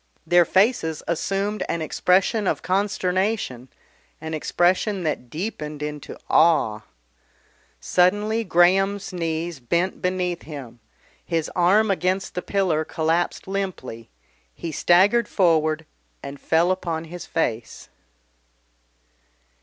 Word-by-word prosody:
Their 175 Hz, +1 st, +5 dB
faces 190 Hz, -5 st, +1 dB
assumed 195 Hz, +5 st, -1 dB
an 170 Hz, -, -1 dB
expression 190 Hz, +6 st, +1 dB
of -, -, -1 dB
consternation, 185 Hz, -, -1 dB, 0.5 s
an 160 Hz, 0 st, -6 dB
expression 180 Hz, +5 st, +1 dB
that 150 Hz, -6 st, -3 dB
deepened 150 Hz, -, -5 dB
into 150 Hz, -1 st, -6 dB
awe. 150 Hz, -10 st, +3 dB, 1.0 s
Suddenly 205 Hz, +5 st, +2 dB
Graham's 195 Hz, +2 st, +2 dB
knees 165 Hz, -2 st, -3 dB
bent 170 Hz, +9 st, -1 dB
beneath 180 Hz, -1 st, -1 dB
him, 135 Hz, -6 st, -9 dB, 0.4 s
his 165 Hz, -3 st, -2 dB
arm 195 Hz, +4 st, +4 dB
against 185 Hz, +1 st, -1 dB
the 180 Hz, -, -3 dB
pillar 180 Hz, -6 st, 0 dB
collapsed 165 Hz, +4 st, -1 dB
limply, 185 Hz, -, -5 dB, 0.5 s
he 165 Hz, -, -5 dB
staggered 200 Hz, +9 st, +4 dB
forward 160 Hz, -4 st, +2 dB, 0.4 s
and 140 Hz, 0 st, -8 dB
fell 170 Hz, +3 st, +2 dB
upon 170 Hz, -3 st, -2 dB
his 175 Hz, +1 st, -9 dB
face. 120 Hz, -8 st, -3 dB
175 Hz, 105 wpm, -23 LUFS, 155-190 Hz, 1.0 s, Their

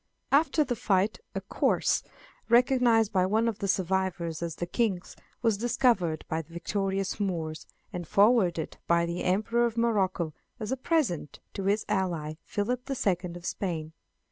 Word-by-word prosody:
After 310 Hz, +2 st, +4 dB
the 250 Hz, -4 st, -2 dB
fight, 205 Hz, -2 st, +1 dB, 0.2 s
a -, -, -1 dB
corse, -, -, +1 dB, 0.5 s
recognized 240 Hz, -3 st, +4 dB
by 185 Hz, -1 st, +3 dB
one 220 Hz, +4 st, +2 dB
of 225 Hz, -3 st, -2 dB
the 200 Hz, -, -2 dB
survivors 185 Hz, -3 st, 0 dB
as 170 Hz, -2 st, -3 dB
the 175 Hz, -, -3 dB
King's, 190 Hz, -1 st, -1 dB, 0.3 s
was 225 Hz, -4 st, +2 dB
discovered 225 Hz, -9 st, +1 dB
by 160 Hz, +1 st, -1 dB
the 165 Hz, -, -19 dB
victorious 195 Hz, +3 st, -2 dB
Moors, 165 Hz, -5 st, -3 dB, 0.3 s
and 175 Hz, -3 st, -5 dB
forwarded 200 Hz, -6 st, +3 dB
by 170 Hz, 0 st, +3 dB
the 170 Hz, +1 st, -3 dB
Emperor 215 Hz, +6 st, +2 dB
of 230 Hz, 0 st, -6 dB
Morocco 190 Hz, -8 st, +1 dB, 0.3 s
as 215 Hz, 0 st, -4 dB
a -, -, +2 dB
present 255 Hz, -, -1 dB
to 195 Hz, -, -4 dB
his 205 Hz, +2 st, +1 dB
ally, 165 Hz, -5 st, -1 dB
Philip 245 Hz, +4 st, -2 dB
the 270 Hz, -1 st, -3 dB
Second 180 Hz, -6 st, -1 dB
of 175 Hz, -, -11 dB
Spain. 160 Hz, -6 st, -3 dB
195 Hz, 160 wpm, -28 LUFS, 170-230 Hz, 0.5 s, After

